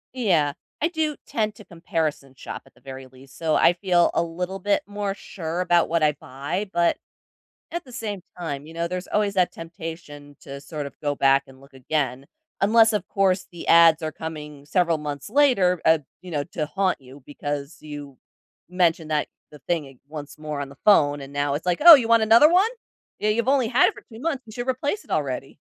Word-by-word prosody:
Yeah. 170 - +2 0.3
I 325 - +3
do 315 -3 -1
tend 215 -2 -1
to 215 - -14
comparison 160 -6 -3
shop - - -7
at 135 - -22
the - - -24
very 135 -1 -9
least, 130 +1 -17
so 160 -2 0
I 175 - +5
feel 175 -1 +2
a - - +2
little 180 +3 -5
bit 200 +1 +1
more 205 -1 -3
sure 170 -4 -6
about 175 -2 +3
what 165 -1 +1
I 150 -1 +4
buy, 145 +10 -5
but, 170 0 +2 0.7
at 345 0 -4
the 255 - -15
same 215 -5 -5 0.2
time, 145 -4 -4
you 160 - -12
know, 170 0 -2
there's 180 +1 -5
always 210 -1 +1
that 185 -2 +2
temptation 160 -4 -9
to 140 0 -9
sort 150 -2 -6
of 140 - -10
go 145 -1 -1
back 135 0 +3
and 130 0 -16
look 135 0 -19
again. 135 0 -2 0.4
Unless, 225 +2 +5
of 210 - -1
course, 190 -1 +1
the 175 - -9
ads 165 -1 +6
are 155 - -2
coming 150 -3 -8
several 170 0 +1
months 145 +1 -6
later, 215 - +3
uh, 160 0 +5 0.2
you 180 -1 -10
know, 145 -2 -2
to 160 -2 -4
haunt 185 +2 -1
you 135 +2 -14
because 145 +1 -5
you 145 -3 -9 0.5
mentioned 170 -3 +1
that 150 -1 +1 0.2
the 150 - -13
thing 165 -4 0
ag 135 -1 -15
once 150 0 -9
more 150 -2 -4
on 140 - -6
the 140 - -15
phone, 145 -8 +5
and 140 0 -10
now 145 0 0
it's 155 - -5
like, 180 +5 0
"Oh, 335 - +13
you 245 -5 0
want 230 -1 +5
another 230 +7 +7
one? 375 +5 +4 0.5
Yeah, 215 0 +1
you've 235 +4 0
only 265 -4 +3
had 250 +3 +4
it - - -8
for - - -12
2 225 -1 -11
months, 280 -5 -2
you 220 - -12
should 245 +3 -4
replace 285 - -2
it - - -15
already." - - -2
165 Hz, 215 wpm, -24 LUFS, 145-205 Hz, 0.7 s, Oh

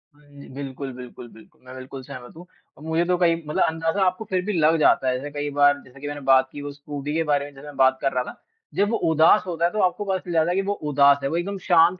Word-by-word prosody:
हाँ 150 0 -24
जी, 140 0 -13
बिल्कुल, 135 0 -6
बिल्कुल, 125 -1 -10
बिल्कुल। 110 - -19
मैं 130 0 -11
बिल्कुल 130 +1 -8
सहमत 130 0 -10
हूँ 175 - -11 0.3
और 150 - -14
मुझे 160 +1 0
तो 180 0 +1
कई 170 -2 +3
मतलब 150 - +1
अंदाज़ा 165 +4 0
आपको 185 +4 -1
फिर 185 -1 0
भी 210 - -1
लग 160 -1 +3
जाता 135 -3 +3
है। 125 - 0
जैसे 145 +3 -6
कई 145 0 -3
बार 145 -1 +4
जैसे 130 +2 -16
कि 145 - -5
मैंने 145 -1 -5
बात 130 0 +5
की 145 - -8
वो 145 0 -6
स्कूटी 145 0 -6
के 165 - +1
बारे 145 -2 0
में 145 - -10
जैसे 135 +1 -13
मैं 145 - -10
बात 130 0 +4
कर 135 - +1
रहा 125 0 0
ना। - - -9 0.4
जब 205 +1 +2
वो 230 - +1
उदास 160 +6 +5
होता 170 -1 -1
है 175 - +1
तो 215 - -3
आपको 185 +3 0
पता 190 -1 0
चल 175 - -8
जाता 160 - 0
है 180 - -1
कि 195 - +2
वो 200 +1 -1 0.2
उदास 140 0 +5
है, 135 - 0
वो 165 - -1
एकदम 195 +3 -3
शांत 175 +1 +4
145 Hz, 290 wpm, -23 LUFS, 140-175 Hz, 0.4 s, बात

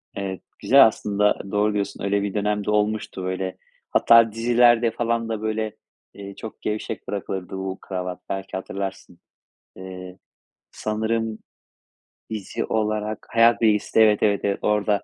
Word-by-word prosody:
Evet, 95 -2 -4 0.2
güzel 135 +1 +7
aslında, 105 -1 0
doğru 105 +1 +2
diyorsun 100 -1 -3
öyle 100 0 +1
bir 100 - -3
dönem 105 0 -1
de - - 0
olmuştu, 105 -2 -1
böyle 95 0 -3 0.3
hatta 115 -1 +6
dizilerde 120 0 +4
falan 115 0 -1
da 110 -2 -3
böyle, 110 0 -2 0.4
eee, 100 -1 -9
çok 110 - -9
gevşek 105 0 -4
bırakılırdı 95 -2 -4
bu 95 0 -4
kravat 90 -1 -5
belki 95 -1 -4
hatırlarsın. 95 -2 -6 0.6
Eee, 90 0 -9 0.5
sanırım 110 +1 -2 0.9
dizi 110 -3 -4
olarak 110 -1 -2
Hayat 115 +1 +4
Bilgisi'nde 110 0 +3
Evet, 105 -1 +3
evet, 100 -1 +3
evet, 100 -1 0
orada 105 -1 +1
105 Hz, 135 wpm, -23 LUFS, 95-110 Hz, 0.9 s, güzel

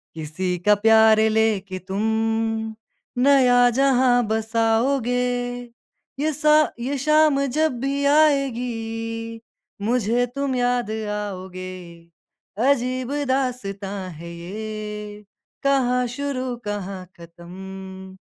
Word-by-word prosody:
किसी 170 +4 -3
का 210 0 +6
प्यारे 220 +1 +5
लेके 210 -4 0
तुम 190 +2 -4 1.2
नया 250 -3 +5
जहाँ 250 -1 +3
बसाओगे, 225 +3 +1 1.1
ये 310 +2 +1
सा 300 +1 +4
ये 265 +4 -2
शाम 305 0 +3
जब 275 -1 0
भी 275 +2 -1
आएगी, 230 -6 0 0.4
मुझे 235 +2 +1
तुम 275 -1 -1
याद 245 -2 0
आओगे, 200 -4 -5 1.0
अजीब 255 -1 0 0.2
दास्ताँ 200 -7 -2
है 170 +2 -9
ये, 210 +3 -7 0.4
कहाँ 250 -2 +2
शुरू 255 0 -3
कहाँ 195 -2 -5
ख़त्म, 190 +2 -10
225 Hz, 90 wpm, -22 LUFS, 200-260 Hz, 1.2 s, का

